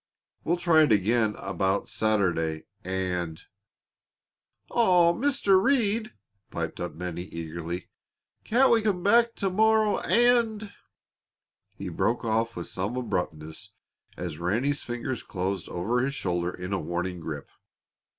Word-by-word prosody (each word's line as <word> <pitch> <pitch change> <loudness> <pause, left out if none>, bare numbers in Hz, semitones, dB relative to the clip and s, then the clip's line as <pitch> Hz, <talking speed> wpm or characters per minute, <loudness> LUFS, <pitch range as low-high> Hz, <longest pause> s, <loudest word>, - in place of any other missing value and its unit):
We'll 170 +2 +1
try 170 -2 +4
it 150 -6 +4
again 110 +1 +2
about 95 +1 -1
Saturday, 85 -7 0 0.2
and 90 -3 -2 0.7
" - - -37
"Aw, 180 -7 +4
Mr. 215 -5 +3
Reed," 225 - +1 0.4
piped 80 -1 -4
up 85 -3 -5
Bennie, 90 0 -4
eagerly, 85 +1 -6 0.6
"can't 260 +4 +4
we 230 - +5
come 200 -5 0
back 230 +3 +4
to 195 -2 -1
morrow 220 +1 +3
and 225 -1 +2 0.5
" - - -52
He - - -5
broke 120 +1 0
off 115 +1 0
with 85 - -5
some 100 +7 -3
abruptness 90 -4 -4 0.4
as 85 -4 -5
Ranny's 120 +12 0
fingers 120 0 -4
closed 95 -1 -3
over 105 +8 -1
his 135 +2 -1
shoulder 90 -5 -1
in 90 +2 -6
a 95 - 0
warning 90 +2 -3
grip. 75 -3 -6
110 Hz, 130 wpm, -27 LUFS, -, 0.7 s, we